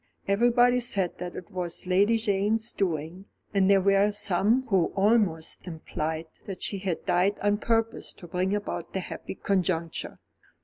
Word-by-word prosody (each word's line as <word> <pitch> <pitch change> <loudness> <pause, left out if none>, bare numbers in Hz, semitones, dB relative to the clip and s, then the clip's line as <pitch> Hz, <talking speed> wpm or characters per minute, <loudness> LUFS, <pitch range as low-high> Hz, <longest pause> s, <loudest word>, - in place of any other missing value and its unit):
Everybody 240 +4 +4
said 200 -7 -1
that 180 -1 -6
it 185 +3 -9
was 180 -2 -4
Lady 200 +5 +3
Jane's 215 +1 0
doing, 170 0 -3 0.3
and 195 -1 +3
there 195 -1 +5
were 200 +2 +3
some 210 +5 +2
who 190 -7 +2
almost 195 -6 +1
implied 160 -1 -4 0.2
that 195 -2 -6
she 200 - -1
had 185 -3 -3
died 185 +4 +2
on 205 0 +1
purpose 225 0 0
to - - -13
bring 180 +3 -1
about 205 - -5
the 190 - -1
happy 185 - -7
conjuncture. 180 -5 -1
195 Hz, 150 wpm, -27 LUFS, 180-210 Hz, 0.3 s, there